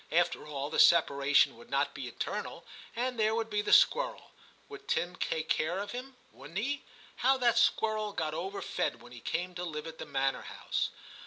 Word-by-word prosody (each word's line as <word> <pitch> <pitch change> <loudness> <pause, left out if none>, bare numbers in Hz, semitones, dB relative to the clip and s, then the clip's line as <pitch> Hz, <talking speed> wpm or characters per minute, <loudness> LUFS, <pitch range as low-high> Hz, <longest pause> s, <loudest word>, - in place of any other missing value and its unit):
After 175 -2 +1
all, 145 -1 -4
the - - 0
separation 145 -6 +5
would 120 - -15
not 140 +2 +1
be 130 - -6
eternal, 120 - -5 0.3
and 245 0 -2
there 215 0 +3
would 225 -1 -2
be 210 0 +1
the - - -2
squirrel. - - +4 0.4
Would 410 -1 -11
Tim 175 +1 0
take 160 -3 -2
care 160 +4 0
of 200 +1 -4
him? 255 +2 -7 0.2
wouldn't 145 +7 -9
he? 280 +7 -1 0.4
How 265 +1 +3
that 240 -2 +3
squirrel 215 -2 +2
got 155 -6 -2
over 190 +5 -4
fed - - -2
when 120 - -14
he 120 - -10
came 180 +9 -3
to 175 0 -5
live 155 -3 -5
at 160 0 -8
the - - -6
manor 135 -1 0
house - - -2
180 Hz, 195 wpm, -31 LUFS, 150-225 Hz, 0.4 s, separation